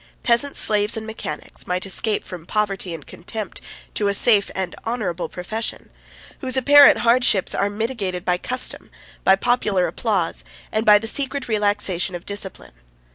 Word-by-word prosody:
Peasants, 240 +4 +2
slaves, 210 +1 +2
and 220 - -5
mechanics, 220 -9 -6
might 180 +1 -1
escape 205 +2 0
from 175 -2 -9
poverty 200 -4 -1
and 160 -4 -7
contempt 205 +2 -7 0.3
to 205 - 0
a 200 - +1
safe 205 -2 +3
and 185 -2 -3
honorable 210 -7 -3
profession; 215 +5 -5 0.5
whose 260 -1 +1
apparent 285 +2 +7
hardships 235 -5 +3
are 200 - 0
mitigated 205 -4 -3
by 180 -1 +1
custom, 255 +5 -1 0.3
by 190 - +6
popular 205 -4 +1
applause, 195 -8 -1 0.3
and 220 +1 -1
by 210 0 +8
the 215 - -4
secret 275 +3 -1
relaxation 205 -4 0
of 175 - -8
discipline. 195 - -5
210 Hz, 150 wpm, -21 LUFS, 185-230 Hz, 0.5 s, by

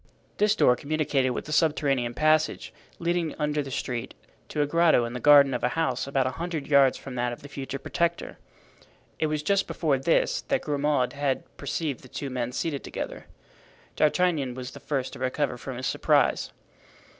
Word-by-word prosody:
This 210 0 +3
door 125 - +4
communicated 140 -1 0
with 125 - -4
a - - -6
subterranean 140 -6 +1
passage, 155 0 +1 0.2
leading 170 -2 -1
under 150 -1 0
the 140 - -6
street 125 -2 -4 0.3
to 150 - 0
a - - +1
grotto 160 -4 +3
in 115 - -6
the 125 - -4
garden 140 0 +7
of 125 - -3
a 125 - +3
house 135 -6 0
about 135 -1 +1
a 130 - 0
hundred 165 -5 -3
yards 140 -3 +4
from 135 - -9
that 120 -1 -1
of 120 - -9
the - - -8
future 135 -1 -5
Protector. 170 +4 -2 0.8
It 155 - +2
was 150 -1 -2
just 195 +4 +1
before 145 -5 0
this 165 +5 +1
that - - +1
Grimaud 145 -3 0
had 140 -2 -1
perceived 145 -1 -3
the 130 - -14
two 140 +1 -5
men 125 -1 -2
seated 140 +2 -3
together. - - -6 0.7
D'Artagnan 150 -5 +1
was 130 0 -6
the - - -11
first 135 -3 -3
to - - -9
recover 130 +2 -1
from 125 +1 -7
his 130 - -4
surprise. - - +2
140 Hz, 185 wpm, -26 LUFS, 130-155 Hz, 0.8 s, garden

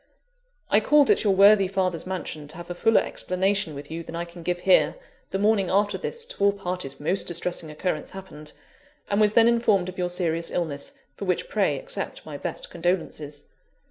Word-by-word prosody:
"I - - +6
called 295 -2 +4
at - - +3
your 200 -3 +3
worthy 200 0 +6
father's 185 -3 -1
mansion, 165 -5 -5
to 150 - -9
have 175 0 -8
a - - -1
fuller 225 +5 +3
explanation 190 -3 -1
with 145 +2 -8
you 165 +1 -4
than 165 - -8
I 170 +1 -3
can 170 0 -12
give 175 +1 -2
here, 190 0 +4 0.3
the - - -2
morning 205 -2 +2
after 200 +1 +2
this 470 - -4
to 200 - -5
all 200 0 +5
parties 180 -7 -4
most 175 +6 0
distressing 175 -1 -1
occurrence 155 0 -3
happened: 155 -6 -10 0.6
and 200 +1 +2
was 210 0 +4
then 230 0 +6
informed 215 -6 +2
of 185 - -9
your 180 0 0
serious 170 -2 -1
illness, 150 -5 -3 0.2
for 200 - -6
which 185 - 0
pray - - +1
accept - - -5
my - - -7
best - - -5
condolences. 155 -4 -2
185 Hz, 195 wpm, -25 LUFS, 170-200 Hz, 0.6 s, I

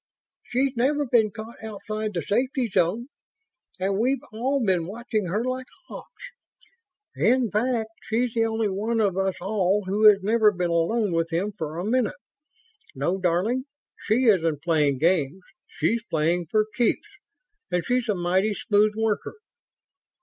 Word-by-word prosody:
"She's 260 +2 -1
never 285 +5 +1
been 235 -4 +3
caught 220 +2 -10
outside 215 -1 -5
the 170 - -1
safety 255 - 0
zone, 200 +10 0 0.7
and 195 +1 0
we've 260 +4 +1
all 260 +5 0
been 180 -4 +1
watching 215 -1 -3
her 205 +7 -1
like 255 0 -3 0.2
hawks. - - -11 0.9
In 245 -2 +2
fact, 225 0 0
she's 230 +1 -1
the 225 -1 +2
only 225 -1 0
one 215 +4 -1
of 200 -4 +2
us 190 -1 0
all 195 +1 0
who 210 +3 +6
has 200 -2 +3
never 215 +1 +4
been 180 -3 -2
alone 180 +4 +1
with 165 0 0
him 190 +6 -1
for 155 -4 -5
a 175 - -3
minute. 240 0 +1 0.8
No, 185 +3 -1
darling, 190 +9 0 0.4
she 225 +4 +3
isn't 165 - +2
playing 150 -5 +2
games. 165 +2 +1 0.2
She's 165 +9 -1
playing 165 +2 0
for 215 -1 +2
keeps, 240 - +1 0.6
and 180 -1 -1
she's 250 -1 0
a 210 - +2
mighty 185 +4 +1
smooth 210 +1 +2
worker." 220 - -1
210 Hz, 150 wpm, -25 LUFS, 180-235 Hz, 0.9 s, who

